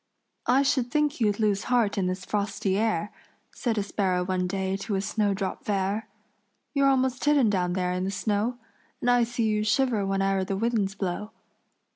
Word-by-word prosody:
"I 265 +3 +4
should 260 -3 +1
think 295 0 0
you'd 210 -1 +2
lose 205 -3 +1
heart 240 -5 +2
in 190 -2 0
this 185 0 -3
frosty 200 -2 -1
air," 210 -1 0 0.4
Said 235 -4 -2
a 205 - +1
sparrow 185 -3 0
one 180 -1 0
day 190 0 -1
to 200 +1 -3
a - - +1
snowdrop 200 -2 -1
fair. 200 +1 -1 0.6
"You're 280 -1 +4
almost 260 -1 +1
hidden 285 -7 +4
down 180 -3 0
there 180 -1 0
in 180 0 -2
the 190 - -1
snow, 210 +4 -1 0.4
And 245 - +2
I 245 -1 +4
see 235 0 -2
you 215 -1 +1
shiver 230 0 +2
whene'er 195 0 +1
the 190 +1 -2
winds 215 -3 0
blow. 195 +2 -3
205 Hz, 180 wpm, -26 LUFS, 195-240 Hz, 0.6 s, I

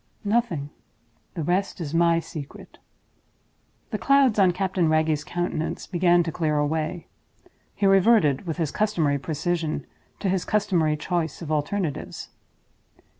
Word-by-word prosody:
"Nothing. 200 -10 0 0.6
The 165 - -3
rest 185 +5 -1
is 160 -3 -5
my 170 0 +3
secret." 155 -3 -9 1.1
The - - -2
clouds 275 -6 +4
on 185 -2 +5
Captain 180 -2 0
Wragge's 155 -1 +1
countenance 175 -1 -3
began 175 -1 +3
to 165 - -3
clear 155 -2 0
away 155 +3 -1 0.4
again. - - -24 0.3
He 200 - 0
reverted, 195 - +4
with 160 - -3
his 160 -4 -1
customary 165 -10 +1
precision, 155 0 -2 0.3
to 200 - -2
his 185 -1 +1
customary 175 -7 +1
choice 165 0 -2
of 155 - -5
alternatives. 155 +1 -2
170 Hz, 130 wpm, -25 LUFS, 155-190 Hz, 1.1 s, on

